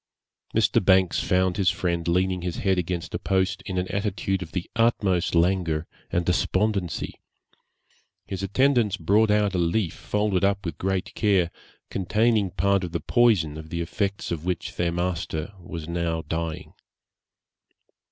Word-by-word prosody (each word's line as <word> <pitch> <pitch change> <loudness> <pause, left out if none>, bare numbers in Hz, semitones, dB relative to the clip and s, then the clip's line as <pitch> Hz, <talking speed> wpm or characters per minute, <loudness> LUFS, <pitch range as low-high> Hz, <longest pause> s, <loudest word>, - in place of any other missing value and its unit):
Mr. - - +3
Banks 95 -2 +4
found 90 0 +1
his 95 -3 +3
friend 85 -2 -1
leaning 90 +1 +1
his 90 -1 -3
head 95 -2 +1
against 90 0 -3
a - - -2
post, 95 +1 0
in 95 -2 -3
an 90 0 0
attitude 100 -1 -1
of 80 -3 -7
the 85 +3 -3
utmost 95 -7 +2
languor 85 -2 +2 0.3
and 85 0 0
despondency. 95 0 0 1.0
His 95 -1 -5
attendants 115 0 +2
brought 105 +6 +3
out 105 -1 +2
a 90 - 0
leaf 85 +1 +1
folded 105 -2 -1
up 100 0 +1
with 85 -4 -4
great 95 0 -1
care, 95 -6 +2 0.4
containing 105 +1 +2
part 100 +1 +1
of 85 -2 -5
the 85 - 0
poison 95 -11 +2
of 80 0 -10
the 85 +1 -3
effects 100 +3 -2
of 80 -2 -3
which 90 0 -3
their 85 -1 0
master 85 0 -2
was 85 -2 -7
now 85 -1 -1
dying. 80 0 -4
90 Hz, 150 wpm, -25 LUFS, 85-100 Hz, 1.0 s, Banks